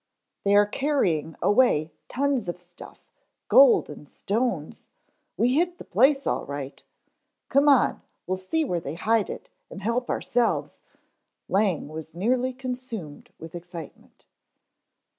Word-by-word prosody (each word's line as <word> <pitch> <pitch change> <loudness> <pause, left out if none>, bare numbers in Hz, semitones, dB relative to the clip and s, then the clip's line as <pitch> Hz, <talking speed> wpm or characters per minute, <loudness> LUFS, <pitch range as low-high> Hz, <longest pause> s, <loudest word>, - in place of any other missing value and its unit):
"They 200 0 +3
are 205 0 +6
carrying 205 - 0
away 205 -9 +3 0.2
tons 270 -7 0
of 175 - -5
stuff; 175 0 -13 0.5
gold 270 -2 +7
and 150 -1 -11
stones. 205 -7 -2 0.5
We 245 +2 +2
hit 350 +4 +1
the - - -9
place 270 +7 +3
all - - 0
right. 140 -1 -7 0.7
Come 280 +2 +4
on, 275 -4 +3 0.2
we'll 185 +1 -2
see 305 +13 -1
where 175 -9 -1
they 155 -2 -6
hide 215 +4 +1
it - - -7 0.2
and 195 - -9
help 235 +3 -1
ourselves 240 -2 -1 0.3
" - - -54
Lang 195 -6 +1
was 160 +1 -8
nearly 250 +7 +1
consumed 250 - -7
with 165 0 -10
excitement. 175 -1 -10
205 Hz, 135 wpm, -25 LUFS, 170-255 Hz, 0.7 s, gold